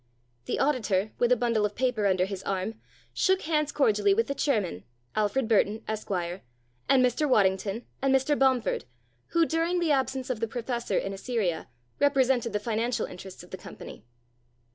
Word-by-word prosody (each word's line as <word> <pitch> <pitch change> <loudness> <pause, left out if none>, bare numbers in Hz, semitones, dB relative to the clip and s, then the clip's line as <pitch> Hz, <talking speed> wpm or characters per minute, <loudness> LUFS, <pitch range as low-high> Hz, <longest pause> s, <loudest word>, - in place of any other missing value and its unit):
The - - -2
auditor, 215 -8 +1
with 240 0 +3
a - - +7
bundle 235 -2 +1
of 210 0 -1
papers 235 -5 +1
under 185 -1 +2
his 195 -1 -5
arm, 195 +4 -3 0.3
shook 380 0 +2
hands 305 -2 0
cordially 210 -9 +3
with 230 +2 +2
the 280 - -2
chairman 210 - -1 0.3
Alfred 215 +4 +1
Burton, 220 0 +2
Esquire 190 -4 -3 0.5
and 255 -2 +5
Mr. 275 +4 +1
Waddington, 195 0 +2 0.2
and 270 0 +2
Mr. 270 +2 +3
Bomford, 260 -3 +2 0.4
who, 335 -1 +3
during 330 +2 0
the 335 -3 +1
absence 265 -2 0
of 240 - -3
the 230 - -1
professor 240 +1 -2
in 195 - -2
Assyria, 195 -5 -2 0.3
represented 265 -4 +3
the 210 - -1
financial 230 +3 -1
interests 185 +1 -10
of - - -16
the - - -5
company. - - -10
230 Hz, 165 wpm, -28 LUFS, 205-265 Hz, 0.5 s, a